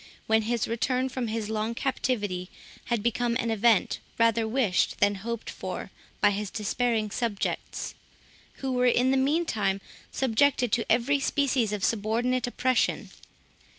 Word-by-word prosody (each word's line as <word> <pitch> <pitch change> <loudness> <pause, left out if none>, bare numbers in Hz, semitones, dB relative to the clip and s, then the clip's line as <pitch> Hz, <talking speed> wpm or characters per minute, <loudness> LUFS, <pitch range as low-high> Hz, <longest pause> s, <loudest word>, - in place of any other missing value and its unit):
when 220 0 +3
his 230 +1 -1
return 250 +3 0
from 255 -2 -3
his 220 -1 -2
long 220 +1 -2
captivity 205 -9 -1 0.4
had 235 -4 -1
become 235 0 0
an 230 -2 0
event 220 -1 +3 0.2
rather 230 -1 +3
wished 220 -6 +1
than 205 0 +4
hoped 225 +3 -5
for - - -6 0.3
by 205 - +5
his 205 0 -3
despairing 220 +1 -1
subjects, 225 -4 -3 0.7
who 265 - 0
were 250 0 +2
in 245 +1 +3
the - - +3
meantime 265 - +1 0.3
subjected 255 -1 +2
to 235 0 0
every 250 +5 +3
species 270 -5 +1
of 210 -2 -3
subordinate 230 +5 +1
oppression. 255 0 0
230 Hz, 140 wpm, -27 LUFS, 215-255 Hz, 0.7 s, by